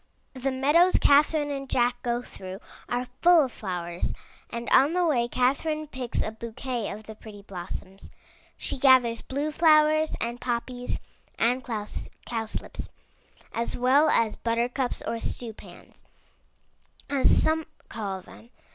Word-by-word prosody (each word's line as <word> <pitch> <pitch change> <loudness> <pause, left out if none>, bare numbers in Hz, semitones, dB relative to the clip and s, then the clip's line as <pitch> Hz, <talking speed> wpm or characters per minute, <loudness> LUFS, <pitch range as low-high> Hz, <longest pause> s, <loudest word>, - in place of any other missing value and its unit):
The 265 0 -2
meadows 295 +8 +4
Catherine 290 +1 +4
and 275 -1 -5
Jack 245 0 +1
go 240 -1 -1
through 190 -3 -8 0.3
are 245 +1 -1 0.2
full 345 -2 +7
of 260 - -3
flowers, 175 -4 -3 0.3
and 235 0 -5
on 280 +5 +5
the 360 0 +2
way 245 -7 +2
Catherine 280 +6 0
picks 255 -5 -3
a 215 - -3
bouquet 230 +1 -4
of 210 +2 -7
the 220 - -9
pretty 210 -2 -12
blossoms. 190 0 -7 0.5
She - - -2
gathers 255 -4 +5
blue 285 +3 -3
flowers 310 0 +4
and 235 +1 -3
poppies 245 0 -3 0.4
and 245 +3 +1
cowslips, 225 0 -5 0.6
as 230 +1 -1
well 270 +5 +4
as 225 -5 +2
buttercups, 240 +2 -1
or 230 - -2
stew 230 0 -3
pans, - - -15 1.0
as 280 -2 +4
some 320 0 +1 0.2
call 195 -4 -4
them. 225 +5 -15
245 Hz, 135 wpm, -27 LUFS, 230-285 Hz, 1.0 s, full